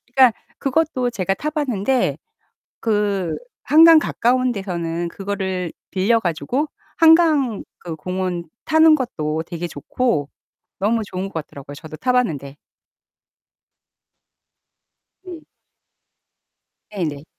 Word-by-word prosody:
그러니까 255 -4 +6 0.2
그것도 275 -3 0
제가 195 -3 -1
타 300 +9 -3
봤는데 265 -5 0 0.6
그 205 -5 0 0.3
한강 325 +1 +8
가까운 255 -2 +1
데서는 175 -4 -3
그거를 190 -3 -3 0.2
빌려 210 +5 +2
가지고 225 - -1 0.3
한강 320 - +4 0.2
그 170 -2 -6
공원 180 +1 -3 0.2
타는 315 0 +6
것도 160 - -2
되게 170 0 -5
좋고 150 - -1 0.5
너무 220 +4 +1
좋은 185 -2 -5
것 - - -21
같더라고요, 145 -3 -7
저도 155 +1 -10
타 255 - 0
봤는데. 145 - -1 2.7
네. 355 -4 -9 1.5
네네. 155 -9 -4
200 Hz, 215 characters per minute, -21 LUFS, 170-260 Hz, 2.7 s, 한강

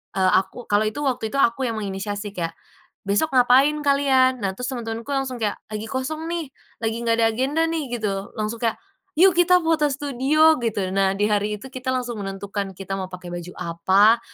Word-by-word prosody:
eee, 185 -1 +3
aku, 195 +6 -7
kalau 210 +1 +3
itu 290 +7 -4
waktu 250 -5 -1
itu - - -1
aku 245 +2 +2
yang 225 - -2
menginisiasi 205 0 -4
kayak, 165 -3 -4 0.5
"Besok 205 +9 +1
ngapain 255 +4 +5
kalian?" 265 -3 +3
Nah, 190 -1 -1
terus 250 +4 -4
teman-temanku 230 +1 -5
langsung 270 -2 -1
kayak, 205 - -1
"Lagi 215 +1 -4
kosong, 275 +5 -3
nih, 335 -4 -3 0.4
lagi 225 0 0
enggak 230 0 +2
ada 225 - +5
agenda, 275 +6 0
nih" 285 -8 -3
gitu. 195 -2 -3
Langsung 215 +2 -3
kayak, 225 - +1 0.4
"yuk, 370 +1 +6
kita 360 +1 +5
foto 320 -2 +2
studio" 290 +4 +3
Gitu. 205 -5 -1
Nah, 195 -1 +3
di 205 - +2
hari 210 0 0
itu 265 - -10
kita 260 0 -4
langsung 245 -4 -3
menentukan 195 0 -4
kita 195 0 -6
mau 185 - -4
pakai 180 -1 -8
baju 175 +1 -6
apa, 195 +7 +4
230 Hz, 195 wpm, -23 LUFS, 200-270 Hz, 0.5 s, yuk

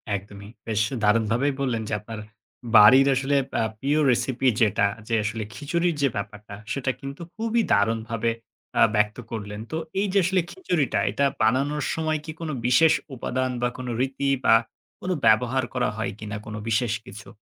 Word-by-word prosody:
একদমই। 100 +1 -8 0.2
বেশ 110 -1 0 0.2
দারুণভাবেই 115 +6 +2
বললেন 120 -5 0
যে - - -3
আপনার 110 +1 -8 0.6
বাড়ির 130 +7 +8
আসলে 135 +2 0 0.3
আ - - +2 0.2
প্রিয় 145 +5 +1
রেসিপি 130 +2 0
যেটা, 100 -2 +3 0.2
যে 115 - +1
আসলে 105 +1 -3
খিচুড়ির 170 +3 -1
যে 140 - +4
ব্যাপারটা 105 0 -6 0.2
সেটা 130 +2 -1
কিন্তু 140 +4 -8
খুবই 230 +1 0
দারুণভাবে 115 +2 +1 0.5
আ - - +5
ব্যক্ত 105 +1 +1
করলেন। 105 -2 -5
তো 160 - -2 0.2
এই 205 - +1
যে - - +3
আসলে 185 0 +2
খিচুড়িটা 175 - 0
এটা 140 +7 +1 0.2
বানানোর 135 +6 +1
সময় 155 -1 -1
কি 160 - -5
কোনো 160 -2 -4
বিশেষ 155 +6 +5 0.2
উপাদান 130 +1 -2
বা 125 - +2
কোনো 125 -1 -5
রীতি 135 +1 -1 0.2
বা - - +7 0.5
কোনো 185 0 -1
ব্যবহার 125 +4 +3
করা 125 -1 +1
হয় 110 - -2
কিনা 105 -1 -5
কোনো 110 +1 -6
বিশেষ 115 0 +1
কিছু? 105 +3 -11
125 Hz, 165 wpm, -24 LUFS, 110-140 Hz, 0.6 s, বাড়ির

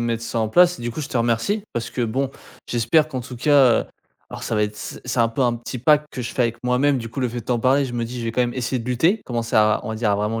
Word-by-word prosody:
mettre 115 -1 -2
ça 115 - -3
en 110 -1 0
place 180 +6 +4
et - - -9
du 120 - -2
coup 155 - -5
je 145 - -5
te - - -3
remercie. 120 - 0
Parce 115 -1 -3
que - - -4
bon 130 +4 -1 0.4
j'espère 120 +7 +2
qu'en 130 -5 -5
tout 125 0 -9
cas 135 -3 +4 0.4
alors - - -8
ça 115 - -2
va 105 - +2
être, 105 0 -2
c 105 - -7
c'est 125 0 -3
un 115 - +4
peu 125 +4 -1
un 120 - +3
petit 120 +2 -6
pacte 150 +4 +3
que 125 - -5
je 115 - -5
fais - - -3
avec 120 0 -1
moi-même, 130 +3 +2
du 115 -2 -5
coup 135 - -5
le 125 - +1
fait 120 +1 -5
de - - -15
t'en 120 -2 0
parler, 135 +3 +3
je 125 - -6
me 120 - -2
dis 125 +1 -7
je 115 - -4
vais 115 - -2
quand 125 - 0
même 120 -1 0
essayer 125 0 -2
de 115 - -7
lutter. 165 - +2
Commencer 120 -2 -2
à, 105 0 +4
on 110 - -4
va - - -3
dire 110 -1 0
à 100 - +2
vraiment 105 +2 -1
120 Hz, 330 wpm, -22 LUFS, 115-130 Hz, 0.4 s, place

